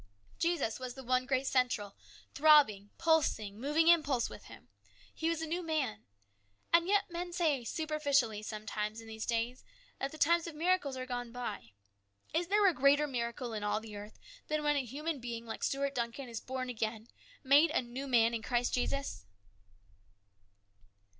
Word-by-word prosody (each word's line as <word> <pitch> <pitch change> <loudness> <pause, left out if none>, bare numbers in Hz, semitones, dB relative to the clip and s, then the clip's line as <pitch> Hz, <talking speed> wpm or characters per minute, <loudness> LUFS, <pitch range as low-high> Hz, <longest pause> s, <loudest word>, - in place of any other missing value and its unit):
Jesus 335 -10 0
was 255 -1 -6
the 265 - -9
one 255 +1 +1
great 265 0 +1
central, 245 -6 0 0.4
throbbing, 280 -10 +5
pulsing, 220 -11 +1
moving 300 +4 +2
impulse 295 -8 +4
with - - -11
him. - - -13 0.5
He 325 - -1
was 330 -1 -1
a - - -1
new 340 +3 -2
man. 290 -10 -2 0.7
And 335 +1 +5
yet 405 -1 +2
men 350 +1 -4
say, 315 -7 +1
superficially, 285 -6 0
sometimes 215 0 -4
in 225 - -11
these 220 0 -6
days, 235 +2 -1 0.4
that 275 - -2
the 310 - -9
times 335 +3 +3
of 330 - -7
miracles 330 -4 +1
are 255 - -4
gone 245 -2 -4
by. 215 - -6 0.6
Is 335 +2 +1
there 410 +1 +4
a 365 - +4
greater 280 +2 +4
miracle 235 -2 -3
in 210 -1 -4
all 210 +1 0
the 220 -1 -10
earth 205 +1 -9 0.3
than 305 0 -1
when 295 0 +2
a 280 - +1
human 295 +5 -4
being 235 -1 -5
like 225 - -6
Stuart 280 0 0
Duncan 240 +2 -3
is 230 -2 -6
born 260 0 -4
again, 220 -2 -3 0.4
made 290 +4 +6
a 300 -4 0
new 250 +3 -6
man 235 -2 +4
in 230 - -2
Christ 245 +2 0
Jesus 265 - -2
260 Hz, 175 wpm, -33 LUFS, 230-310 Hz, 0.7 s, made